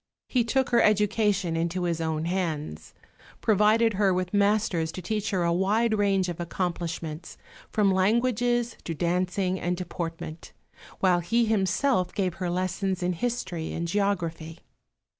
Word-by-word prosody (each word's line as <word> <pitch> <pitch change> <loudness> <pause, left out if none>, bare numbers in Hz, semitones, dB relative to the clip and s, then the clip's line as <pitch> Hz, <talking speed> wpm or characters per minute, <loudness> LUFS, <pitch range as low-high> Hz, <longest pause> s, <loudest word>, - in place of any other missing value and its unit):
He 250 -2 +2
took 265 +3 +1
her 235 - +5
education 210 -4 +2
into 170 +2 -1
his 170 -2 -1
own 160 -1 -1
hands, 165 - -3 0.4
provided 215 +2 +3
her 195 0 +2
with 180 +1 -1
masters 200 -5 +2
to - - -6
teach 210 +3 -2
her 185 -3 0
a 170 0 +2
wide 215 +5 +2
range 195 -3 +2
of 175 -1 -5
accomplishments, 170 -2 -4 0.3
from 205 -2 +2
languages 235 +4 +1
to 165 - -3
dancing 180 +3 0
and 175 0 -1
deportment, 165 -2 -6 0.5
while 180 -2 +4
he 230 +7 +1
himself 210 -1 +1
gave 185 -4 0
her 180 - 0
lessons 185 +1 -1
in 180 +1 +1
history 175 -5 -3
and 170 +1 -3
geography. 170 -4 -1
185 Hz, 140 wpm, -26 LUFS, 170-210 Hz, 0.5 s, her